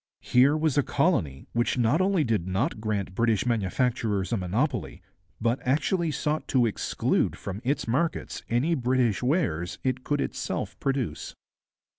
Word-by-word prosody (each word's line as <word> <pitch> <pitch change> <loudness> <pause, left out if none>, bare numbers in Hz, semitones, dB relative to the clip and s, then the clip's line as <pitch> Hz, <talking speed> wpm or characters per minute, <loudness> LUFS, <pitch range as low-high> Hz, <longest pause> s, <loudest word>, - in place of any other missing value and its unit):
Here 135 +5 +4
was 155 -2 +2
a - - +6
colony 125 - 0
which 120 +2 +1
not 125 +8 +3
only 190 -3 +2
did 110 -8 0
not 105 - -1
grant 105 -4 -2
British 115 0 +1
manufacturers 115 -2 0
a - - +2
monopoly, 120 - -2 0.4
but 115 +3 +1
actually 160 +6 +1
sought 150 +1 -2
to 125 -3 +3
exclude 110 - 0
from 100 +1 -6
its 140 +1 -1
markets 145 +8 -1
any 125 +9 +2
British 125 -5 +1
wares 125 - 0
it 130 -1 -1
could 145 +1 0
itself - - -3
produce. 135 - -2
125 Hz, 145 wpm, -27 LUFS, 110-145 Hz, 0.4 s, a